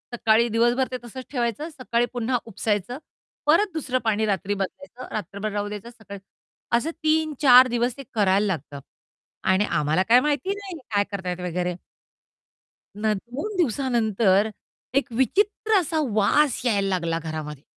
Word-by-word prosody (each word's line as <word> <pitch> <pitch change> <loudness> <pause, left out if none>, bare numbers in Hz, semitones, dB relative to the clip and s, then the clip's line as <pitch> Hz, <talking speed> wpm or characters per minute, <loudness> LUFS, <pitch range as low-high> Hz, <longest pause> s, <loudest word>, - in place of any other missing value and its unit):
सकाळी 225 0 +3
दिवसभर 240 +3 +2
ते 255 - -2
तसंच 250 +2 -9
ठेवायचं, 245 +3 -2
सकाळी 245 -5 -1
पुन्हा 245 +1 0
उपसायचं. 215 +1 -2 0.5
परत 350 +7 +3
दुसरं 265 -5 -1
पाणी 220 -1 +1
रात्री 200 -1 -1
बदलायचं 245 +6 -6
रात्रभर 205 +1 -4
राहू 205 0 -2
द्यायचं 210 +2 -7
सकाळी, 220 -4 -11 0.6
असं 300 +7 -2
3-4 300 -5 +5
दिवस 240 +1 -1
ते 275 - -7
करायला 200 -1 +3
लागतं 150 -6 -4 0.7
आणि 190 +2 +3
आम्हाला 155 +3 +1
काय 245 +2 +8
माहिती 300 +8 0
नाही 390 -5 -8
काय 205 -1 +3
करतायत 185 -3 -4
वगैरे. 180 0 -2 1.2
नं 210 0 0
दोन 270 - -6
दिवसानंतर 225 - +2 0.5
एक 275 -2 +1
विचित्र 415 - +2
असा 320 -2 -1 0.2
वास 250 +6 +3
यायला 200 -5 +2
लागला 170 -3 -1
घरामध्ये. 155 -3 -6
230 Hz, 140 wpm, -24 LUFS, 200-265 Hz, 1.2 s, काय